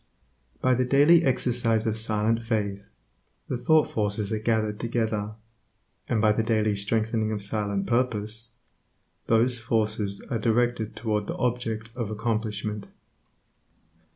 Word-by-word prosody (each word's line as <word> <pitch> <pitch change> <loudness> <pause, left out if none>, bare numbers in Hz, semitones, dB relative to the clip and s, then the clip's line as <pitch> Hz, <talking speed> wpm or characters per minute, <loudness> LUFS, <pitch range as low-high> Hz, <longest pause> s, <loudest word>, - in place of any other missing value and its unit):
By 130 - +3
the 130 +1 +2
daily 145 +6 +5
exercise 120 -4 +1
of 110 -1 0
silent 110 +1 +1
faith, 100 -3 -2 0.6
the - - -2
thought 155 +6 +3
forces 105 0 -1
are 110 - -1
gathered 110 -1 0
together, 110 -3 -2 0.8
and 115 - +1
by 105 0 +4
the 105 - +1
daily 110 -2 +1
strengthening 110 +2 0
of 105 -2 -3
silent 100 -1 -1
purpose, 115 -2 -1 0.8
those 120 +2 +3
forces 110 -3 -1
are 115 - 0
directed 115 0 0
toward 105 -2 -2
the - - -4
object 115 -2 -2
of 115 -4 -3
accomplishment. 105 -2 -3
110 Hz, 125 wpm, -26 LUFS, 105-120 Hz, 0.8 s, daily